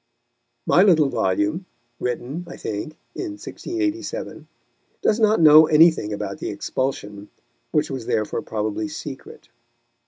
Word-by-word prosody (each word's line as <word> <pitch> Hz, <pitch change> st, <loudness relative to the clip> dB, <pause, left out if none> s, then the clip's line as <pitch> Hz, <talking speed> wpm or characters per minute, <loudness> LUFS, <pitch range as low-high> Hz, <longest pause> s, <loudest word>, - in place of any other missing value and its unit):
My 175 Hz, -, +5 dB
little 165 Hz, -8 st, +5 dB
volume 105 Hz, -, -1 dB, 0.3 s
(written, 125 Hz, +7 st, -3 dB
I 175 Hz, -, -9 dB
think, 110 Hz, +9 st, -5 dB, 0.2 s
in 345 Hz, -5 st, -5 dB
1687) 345 Hz, +7 st, -4 dB, 0.6 s
does 220 Hz, -, +2 dB
not 215 Hz, 0 st, +3 dB
know 155 Hz, -1 st, +8 dB
anything 160 Hz, -8 st, +4 dB
about 105 Hz, -1 st, -4 dB
the -, -, -4 dB
expulsion, 105 Hz, -6 st, -4 dB, 0.4 s
which 150 Hz, -1 st, 0 dB
was 130 Hz, -4 st, -5 dB
therefore 105 Hz, -1 st, -1 dB
probably 110 Hz, +8 st, -3 dB
secret. 150 Hz, -3 st, -9 dB
150 Hz, 120 wpm, -22 LUFS, 110-180 Hz, 0.6 s, know